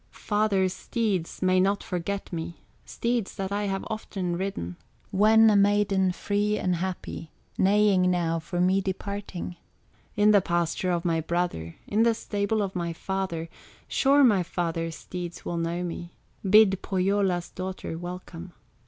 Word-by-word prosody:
Father's 205 -3 0
steeds 200 -8 -2
may 185 0 +4
not 200 +2 +2
forget 185 +2 -4
me, 170 0 -5 0.2
Steeds 235 -3 -2
that 195 0 -4
I 205 +1 -1
have 195 -1 -2
often 195 -5 -3
ridden, 170 - -4 0.3
When 220 +3 +6
a - - +3
maiden 200 -2 +3
free 205 +3 0
and 180 -1 0
happy, 180 -2 -5 0.3
Neighing 195 -2 +4
now 170 -2 +1
for 175 +2 -4
me 185 +2 +3
departing, 190 -2 -5 0.6
In 210 0 +5
the 205 -2 +6
pasture 170 +1 0
of 175 -1 0
my 165 -2 +1
brother, 160 - -2
In 210 +2 +1
the 230 0 +4
stable 205 0 -1
of 195 -1 -4
my 170 -2 -2
father; 185 -2 -3 0.4
Sure 280 +1 +4
my 210 -7 +5
father's 165 -2 -2
steeds 175 -1 -7
will 170 - -2
know 170 +1 -1
me, 170 0 -6 0.3
Bid 200 -2 +6
Pohyola's 190 -2 0
daughter 185 -2 -5
welcome. 175 0 -8
185 Hz, 145 wpm, -27 LUFS, 175-205 Hz, 0.6 s, When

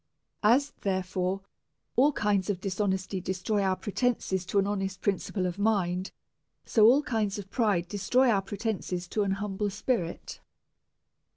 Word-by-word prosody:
As, 260 +7 +4
therefore, 185 0 -1 0.5
all 275 +5 +5
kinds 205 -7 0
of 195 -3 0
dishonesty 190 -1 -1
destroy 190 +3 -1
our 190 -1 +2
pretences 205 -4 -1
to - - -1
an 195 - +4
honest 195 -2 -2
principle 195 -1 -1
of 180 +2 -3
mind, 190 -4 +1 0.6
so 220 -1 +6
ail 285 +3 +3
kinds 215 -5 -1
of 195 -1 -8
pride 200 -8 +1
destroy 245 +7 +2
our 200 -3 +2
pretences 195 -3 -3
to 215 - 0
an 195 -1 +1
humble 205 +1 -2
spirit. 210 -4 -3
200 Hz, 145 wpm, -28 LUFS, 185-215 Hz, 0.6 s, so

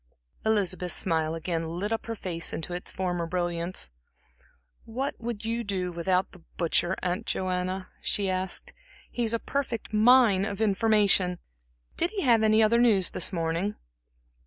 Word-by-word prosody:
Elizabeth's 190 -5 0
smile 160 -2 0
again 165 0 -2 0.2
lit 205 +4 -2
up 225 0 -2
her 230 - -3
face 170 -5 -3
into 170 +2 -4
its 180 - -4
former 175 -2 -2
brilliance. 175 - -1 0.9
"What 260 +5 -3
would 230 -2 -5
you 230 +1 -1
do 185 -4 -2
without 180 +2 0
the 180 - -16 0.2
butcher, 175 +1 +1
Aunt 180 0 -2
Joanna?" 185 0 -2
she 200 -1 +1
asked. 185 0 -2 0.4
"He's 230 -1 0
a - - +2
perfect 235 -4 -3
mine 220 -3 +5
of 200 -1 -4
information. 205 -4 +3 0.6
Did 340 - +1
he 400 -1 -3
have 235 -5 +5
any 220 0 +5
other 230 +2 +4
news 215 -6 +4
this - - +1
morning?" 170 +3 -1
190 Hz, 150 wpm, -27 LUFS, 180-225 Hz, 0.9 s, mine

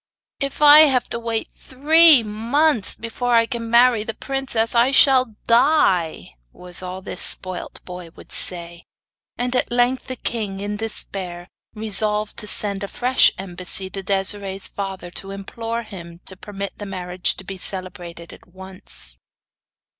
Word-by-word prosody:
'If 275 +2 -2
I 295 +1 +9
have 270 -5 +5
to 235 - -3
wait 230 -1 -3
three 300 +1 +5
months 230 +4 +1
before 240 +1 -2
I 230 0 +5
can 230 -2 -5
marry 235 -1 +4
the 225 0 -5
princess 265 -4 +1
I 240 +2 +4
shall 260 -4 +4
die!' 190 - +2 0.2
was 180 0 -8
all 185 +1 -7
this - - -6
spoilt 185 -1 -5
boy 180 -2 -9
would - - -15
say; 170 -1 -3 0.5
and 245 +1 -2
at 250 - 0
length 245 +1 +1
the 255 - -4
king, 210 -5 -3
in 205 +1 -4
despair, 190 -5 -5 0.3
resolved 210 0 0
to 210 - -3
send 200 -1 +1
a - - -3
fresh 250 +5 +3
embassy 185 0 -2
to 195 - -6
Desiree's 195 0 -2
father 190 -3 -6
to 195 - -8
implore 225 +4 -5
him 170 -5 -11
to 190 - -6
permit 200 +1 -7
the 205 - -6
marriage 180 -1 -3
to - - -9
be 195 - -8
celebrated 180 -3 -4
at - - -17
once. 185 - -9
210 Hz, 155 wpm, -21 LUFS, 185-240 Hz, 0.5 s, I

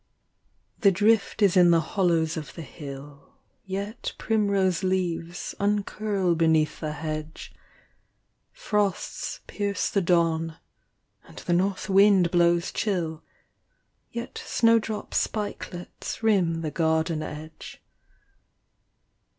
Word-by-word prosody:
rhe 200 - +8
drift 210 +3 +2
is 195 -2 +4
in 180 -1 +6
the 170 -1 +5
hollows 165 -4 +2
of 155 -2 -7
the 165 - -7
hill, 140 -1 -10 0.3
Yet 200 +4 -4
primrose 200 -5 +1
leaves 175 -2 -2
uncurl 205 -2 0
beneath 160 -2 +2
the 155 -1 -3
hedge; 155 0 -6 1.0
Frosts 210 - -2
pierce 200 -2 -2
the 200 - +2
dawn, 165 -2 +1 0.7
and 80 - -16
the 175 - -2
north 185 +2 0
wind 195 -3 +5
blows 170 -1 +3
chill, 170 -6 -2 0.9
Yet 235 +1 -6
snowdrop 225 -2 +1
spikelets 205 -2 -4
rim 180 -7 +2
the 155 -2 -3
garden 160 0 +1
edge. 155 +1 -8
175 Hz, 100 wpm, -26 LUFS, 160-200 Hz, 1.0 s, rhe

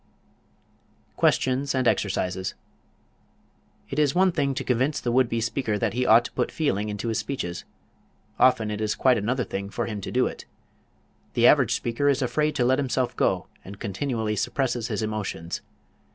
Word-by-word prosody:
QUESTIONS 135 +2 +1
AND 130 -2 +1
EXERCISES 95 -3 -1 1.4
It 135 - -1
is 145 -2 +2
one 185 +1 +4
thing 140 -5 0
to - - -2
convince 130 +4 +1
the 120 - -2
would 125 0 +3
be 115 - -1
speaker 115 -1 -1
that - - -1
he 125 +1 0
ought 115 +2 +6
to - - -6
put 125 - -1
feeling 105 -9 -1
into 105 +3 -3
his 110 - 0
speeches; 90 -11 -4 0.7
often 120 -4 +4
it 105 0 -4
is 110 -1 0
quite 130 -3 +3
another 125 +5 0
thing 100 -2 -5
for 120 +3 -3
him 105 -3 -5
to - - -5
do - - +2
it. - - -6 0.9
The - - +4
average - - +5
speaker 120 +5 0
is 140 -1 +1
afraid 150 +5 0
to 125 -4 +2
let 130 +2 +3
himself 130 -2 -1
go, 90 -2 +1 0.2
and 100 +1 -10
continually 110 +1 -2
suppresses 120 +1 -1
his - - -2
emotions. 105 -6 -4
120 Hz, 175 wpm, -25 LUFS, 105-130 Hz, 1.4 s, ought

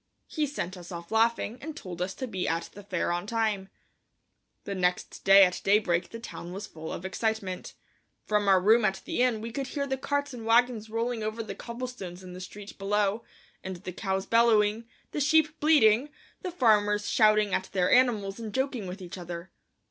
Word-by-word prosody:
He 305 -2 -1
sent 195 -10 -4
us 175 +1 -11
off 170 -1 -8
laughing 230 +1 +1
and 315 +1 -7
told 180 -2 -7
us 185 +1 -2
to 260 - -4
be 190 -5 -3
at 165 0 -2
the 205 - -10
fair 190 -4 -2
on 175 +3 -2
time. 215 -4 -1 0.9
The 200 - -4
next 180 -1 -1
day 195 0 +8
at 180 - -2
daybreak 190 -4 +2
the 230 - -8
town 180 -6 -8
was 200 +2 -5
full 160 -4 -8
of 180 - -6
excitement. 195 -1 -3 0.5
From 210 -1 +1
our 190 -1 +6
room 220 +5 +5
at 195 -2 0
the - - -1
inn 245 -4 +2
we 230 +1 -5
could 270 +2 -3
hear 280 0 -2
the 265 -1 -2
carts 285 0 -1
and 235 -2 -7
wagons 230 -1 +2
rolling 230 +1 -2
over 215 +1 -3
the 215 - -6
cobblestones 235 -7 -7
in 180 -1 -9
the 180 - -8
street 205 +2 -10
below, 205 +2 0 0.4
and 190 0 -5
the 180 +1 -8
cows 190 0 -2
bellowing, 225 -1 +3 0.3
the - - -3
sheep 310 +1 +3
bleating, 280 -4 +5 0.3
the 370 - -3
farmers 210 -9 +3
shouting 215 -2 +4
at 190 - -1
their 180 -1 +1
animals 220 -6 +3
and 220 -2 -6
joking 260 -6 -1
with 185 +1 -7
each 180 +1 -8
other. 175 +1 -7
210 Hz, 195 wpm, -28 LUFS, 190-235 Hz, 0.9 s, day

